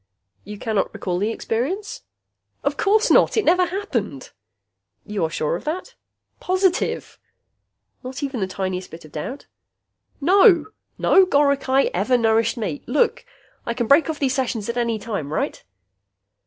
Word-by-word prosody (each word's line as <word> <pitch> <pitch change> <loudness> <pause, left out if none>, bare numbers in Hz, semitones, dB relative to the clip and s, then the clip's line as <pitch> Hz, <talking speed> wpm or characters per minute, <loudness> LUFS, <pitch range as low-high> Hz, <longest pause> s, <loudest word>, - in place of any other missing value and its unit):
"You 210 +1 -8
cannot 215 -1 -1
recall 180 -2 -2
the 205 +3 0
experience?" 275 - -3 0.6
"Of - - 0
course 430 +2 +2
not. - - +4
It 435 - +2
never 360 +2 +4
happened." 265 - -4 0.7
"You 210 -3 -3
are - - -2
sure 155 0 -1
of - - -7
that?" 325 +5 -4 0.5
"Positive." 370 0 0 0.8
"Not 255 +3 -6
even 270 -3 -3
the 190 - -1
tiniest 185 -1 -4
bit 165 0 -11
of 155 - -15
doubt?" 245 - -6 0.7
"No! 365 - +5 0.3
No 380 -1 +5
goricae 280 -3 +2
ever 215 +8 +2
nourished 225 0 +2
me. 185 -10 -3
Look, 300 - +1 0.4
I 235 - -3
can 240 -1 -1
break 285 +7 +4
off 315 - -2
these 270 -3 0
sessions 245 -6 -2
at 235 - -2
any 235 -2 0
time, 200 -10 -5
right?" - - -2
245 Hz, 150 wpm, -22 LUFS, 205-320 Hz, 0.8 s, No